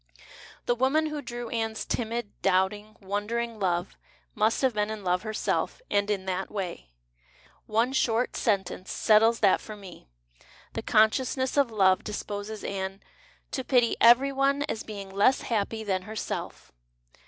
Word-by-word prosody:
The 240 - +2
woman 265 +6 +2
who 300 -1 -3
drew 240 -2 -6
Anne's 225 -1 -2
timid, 230 -2 -3
doubting, 195 +3 +1
wondering 215 +3 -3
love 175 -2 -1 0.3
must 220 +5 +1
have 260 -2 +3
been 210 0 0
in 215 -2 -5
love 180 0 +1
herself 215 0 -2
and 205 0 +2
in 195 -2 -1
that 190 0 -2
way. 180 - -5 0.8
One 230 +4 +1
short 240 -2 +1
sentence 190 -4 -1
settles 225 +2 +4
that 200 -3 +4
for 215 - -8
me. 190 - -12 0.7
The - - -3
con 215 0 +5
sciousness 260 0 -2
of 280 -4 +3
love 190 -4 +3
disposes 210 0 -5
Anne 195 0 -4 0.2
'' - - -33
to 260 - -2
pity 245 -3 +3
every 245 +4 +7
one, 275 +1 +1
as 225 -7 -3
being 200 -3 -8
less 205 +7 +3
happy 220 -1 -1
than 190 -3 -1
herself." 215 +3 -6
215 Hz, 155 wpm, -27 LUFS, 200-240 Hz, 0.8 s, every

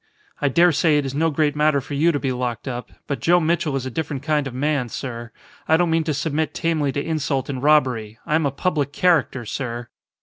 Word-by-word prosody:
I 145 - +2
dare 170 +6 +5
say 155 0 +3
it 145 - 0
is 135 - -4
no 160 +3 +2
great 150 -1 +1
matter 150 -1 +3
for 140 +2 -8
you 155 +4 +3
to 145 - -1
be 135 - -1
locked 125 0 -3
up. 125 -1 -5
But 140 - -3
Joe 175 +1 +4
Mitchell 160 -3 0
is 135 -1 -2
a 130 - -4
different 145 0 -4
kind 150 -2 +1
of 130 - -7
man, 140 -2 0
sir. 120 -1 -6 0.4
I 160 - +5
don't 175 -1 +1
mean 165 -1 +1
to 155 - 0
submit 155 +1 -1
tamely 160 -4 0
to 140 - -2
insult 145 -5 -1
and 130 -2 -3
robbery. 130 -7 +2
I - - -2
am 160 -2 +3
a - - -2
public 145 -1 -1
character, 155 -9 +2
sir." 120 0 -5
145 Hz, 235 wpm, -22 LUFS, 130-160 Hz, 0.4 s, dare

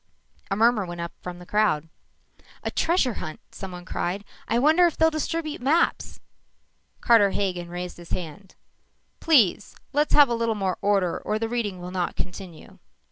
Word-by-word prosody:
_" - - -33
A 195 - 0
murmur 225 0 +3
went 175 0 -7
up 170 0 -4
from 180 -1 -7
the 180 - -12
crowd. 190 -7 +1 0.8
"A - - -2
treasure 325 -8 +1
hunt!" 155 - -6
someone 180 -2 -8
cried. 190 +2 -3 0.2
"I 230 - +1
wonder 315 +7 +5
if 335 - -4
they'll 320 0 +4
distribute 310 -1 -3
maps!" 310 +7 +1 0.8
Carter 225 -4 +5
Hagen 180 -3 -2
raised 180 0 -6
his 175 -1 -12
hand. 180 +2 -6 0.6
"Please! 235 - +3 0.2
Let's 295 +2 +2
have 290 -1 +8
a 240 - -1
little 230 -1 0
more 190 -3 -2
order 195 -4 +1
or 215 - -2
the 225 +1 -2
reading 225 -6 -2
will 180 +1 -7
not 180 -2 -2
continue." 180 -3 -8
205 Hz, 170 wpm, -25 LUFS, 180-245 Hz, 0.8 s, have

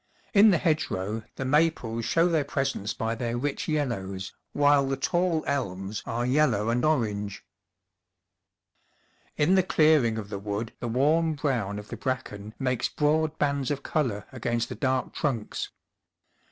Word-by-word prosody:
In 210 +1 +8
the 185 - +4
hedgerow 115 - -1
the 135 - -4
maples 130 -6 +1
show 165 +1 +3
their 160 -4 +2
presence 135 -7 -2
by 110 0 -2
their 120 0 -2
rich 145 +9 -2
yellows, 100 - -2 0.2
while 145 -1 +4
the 135 0 -1
tall 175 +3 +1
elms 100 -7 -2
are 120 +1 -1
yellow 125 -6 +2
and 120 +1 +1
orange. 105 -9 0 1.9
In 150 +5 +3
the 190 - +6
clearing 155 -10 +3
of 105 -2 -5
the 100 - -4
wood 105 +3 -4
the 120 - -3
warm 155 +7 +2
brown 120 -9 -1
of 105 0 -8
the - - -6
bracken 110 -5 -4
makes 130 -3 0
broad 155 +1 +1
bands 140 -2 0
of 140 -1 -2
colour 115 -10 -1
against 120 -1 -2
the - - -5
dark 130 -2 -1
trunks. 120 -8 -2
130 Hz, 150 wpm, -27 LUFS, 110-150 Hz, 1.9 s, In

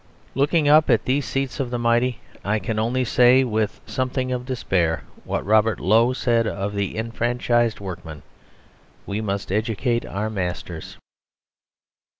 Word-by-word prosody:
Looking 145 +3 +2
up 155 +1 +6
at - - +3
these 135 +2 +1
seats 135 -2 -2
of 130 -3 -1
the 120 - -2
mighty 120 +1 +1 0.2
I 110 +2 +1
can 110 0 -3
only 125 +3 0
say, 125 +2 +5
with 110 -3 -1
something 130 -1 -2
of 125 0 -3
despair, 90 -10 0 0.2
what - - -2
Robert 110 +1 +3
Lowe 115 +5 +4
said 120 -3 +1
of 100 0 -3
the 100 0 -2
enfranchised 120 0 0
workmen: 85 -6 -8 0.8
"We 100 +2 -3
must 100 -3 -3
educate 115 +3 0
our 105 +2 -3
masters." 90 -4 -5
115 Hz, 145 wpm, -23 LUFS, 100-125 Hz, 0.8 s, up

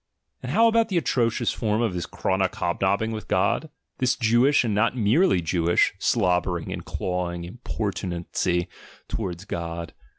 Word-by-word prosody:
And - - -5
how 230 - +5
about 230 0 +3
the 185 - 0
atrocious 120 -6 +1
form 110 0 0
of 110 -5 0
this 90 -2 -3
chronic 95 0 -1
hobnobbing 100 +5 0
with 110 -1 -6
God? 100 +11 +1 0.3
This 130 -2 +2
Jewish, 120 +4 +3
and 115 -3 -1
not 115 +4 +1
merely 115 - +3
Jewish, 85 0 +2
slobbering 90 -1 +1
and - - -6
clawing 90 -1 -3
importunacy 90 -3 -2 0.4
towards 95 -3 -4
God! 85 -3 -5
100 Hz, 140 wpm, -25 LUFS, 90-120 Hz, 0.4 s, how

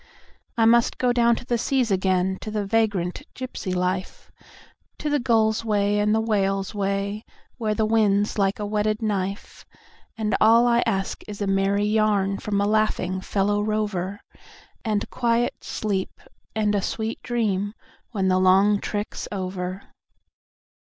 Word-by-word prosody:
I 225 - +4
must 235 +1 +4
go 250 -1 +2
down 235 -1 +4
to 240 - -8
the 240 -1 0
seas 250 -2 +1
again, 190 0 +1
to - - -5
the 210 -1 -2
vagrant 200 -4 0
gypsy 250 -7 -4
life, 180 +1 -3 0.7
To 300 - -3
the 290 - +2
gull's 225 -3 +2
way 205 -1 +1
and 210 +1 +2
the - - +2
whale's 195 -3 0
way, 200 +1 -2 0.4
where 215 -2 0
the 220 - +1
wind's 210 -2 +2
like 195 0 +2
a 210 - -3
whetted 215 +1 -1
knife; 200 -1 -3 0.5
And 215 -1 0
all 230 +2 +6
I 240 0 +3
ask 195 -3 -1
is 205 -1 -7
a 205 - -1
merry 195 +1 +1
yarn 210 -2 +1
from 205 -1 -1
a 200 - +2
laughing 205 -3 0
fellow 205 +2 0
rover, 205 -1 -2 0.6
And 210 -2 -1
quiet 240 0 0
sleep 200 -3 -3 0.4
and 210 -1 +1
a 200 - +1
sweet 220 +3 -3
dream 210 -4 -1 0.3
when 195 -5 -1
the 185 0 +3
long 195 +2 +4
trick's 205 0 -4
over. 185 -1 -4
210 Hz, 150 wpm, -24 LUFS, 195-220 Hz, 0.7 s, all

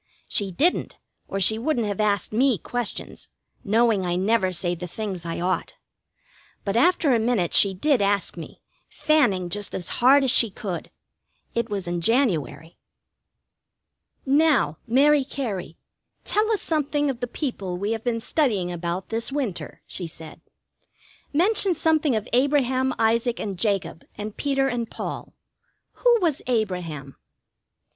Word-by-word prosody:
She 200 -2 -1
didn't, 315 - +1 0.3
or 195 - -3
she 220 +4 +4
wouldn't 245 -2 0
have 205 0 -2
asked 205 0 0
me 250 0 +3
questions, 245 +7 -5 0.4
knowing 220 -1 +2
I 175 -1 -1
never 190 0 +2
say 175 0 0
the 175 +1 -6
things 185 -3 -5
I 165 - -3
ought. 185 +2 -1 0.9
But 200 0 -1
after 290 +2 +3
a 235 - +3
minute 220 -7 0
she 195 -2 +5
did 265 +4 +2
ask 200 -1 +1
me, 170 - -10 0.3
fanning 290 - +2
just 205 +3 -4
as 175 -4 -3
hard 275 +3 +6
as 260 - +3
she 230 -3 +4
could. 190 -3 -6 0.6
It 235 0 -1
was 195 -4 -3
in 175 0 -2
January. 165 - 0 1.5
"Now, 280 - +3
Mary 280 +4 +4
Cary, 215 - -5 0.5
tell 430 +2 +1
us 430 - 0
something 295 -2 0
of 245 - -9
the 245 - -2
people 200 - -4
we 200 +4 -2
have 225 -1 -3
been 235 -2 -1
studying 225 - 0
about 175 +2 -4
this 230 +3 -2
winter," 265 -10 -4
she 175 - -5
said, 160 -1 -11 0.9
"Mention 380 +3 +3
something 315 -4 +2
of 215 +1 -2
Abraham, 260 0 +2
Isaac, 230 +2 +1
and 200 -3 -3
Jacob, 190 -4 -2
and 210 0 -6
Peter 275 -1 0
and 240 -3 -2
Paul. - - -6 0.6
Who 480 -1 +3
was 325 -6 +1
Abraham?" 180 - -2
225 Hz, 145 wpm, -24 LUFS, 185-270 Hz, 1.5 s, hard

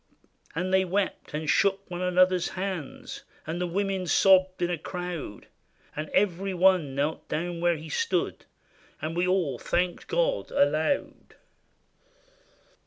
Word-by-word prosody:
And 185 +3 -1
they 190 0 +5
wept, 190 +2 -2
and 155 0 -3
shook 195 +5 +2
one 175 -1 -5
another's 180 0 +3
hands. 185 -6 -5 0.2
And 165 +3 -3
the 180 - 0
women 190 0 -1
sobbed 185 +1 +4
in 175 - +1
a 175 - -1
crowd; 175 - -6 0.5
And 155 0 -4
every 190 0 +1
one 180 -6 +3
knelt 145 +3 -2
down 170 +2 -2
where 175 0 +3
he 160 +1 -8
stood, 460 - -1 0.5
And 160 +1 -4
we 175 +1 +1
all 175 -9 +1
thanked 175 0 -1
God - - 0
aloud. 155 - 0
180 Hz, 135 wpm, -27 LUFS, 165-190 Hz, 0.5 s, they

